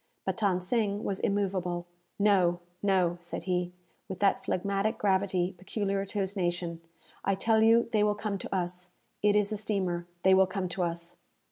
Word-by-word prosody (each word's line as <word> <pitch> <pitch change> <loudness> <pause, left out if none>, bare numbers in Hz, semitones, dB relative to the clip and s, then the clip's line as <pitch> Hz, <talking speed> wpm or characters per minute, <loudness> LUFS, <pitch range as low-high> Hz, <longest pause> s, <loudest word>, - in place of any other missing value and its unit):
But - - -1
Than 195 -5 +1
Sing 205 0 0
was 195 - -2
immoveable. 185 -3 -1 0.3
"No, 190 -4 +3 0.2
no," 185 -3 +2
said 175 -1 -5
he, 180 -1 -1 0.4
with 190 - -4
that 200 -1 +2
phlegmatic 200 +4 0
gravity 190 -2 +1
peculiar 195 +1 -2
to 210 - -6
his 195 0 0
nation. 175 -2 -2 0.4
"I 195 - +2
tell 220 +3 +2
you 230 +1 +5
they 215 -2 +3
will 210 0 +2
come 210 -1 -3
to 195 - -4
us. 180 0 -3 0.3
It 210 0 +4
is 210 0 +2
a 215 - -1
steamer. 185 -5 -1 0.2
They 190 - +6
will 190 0 +6
come 190 -1 -2
to 180 - -3
us." 170 0 -3
190 Hz, 175 wpm, -29 LUFS, 180-205 Hz, 0.4 s, They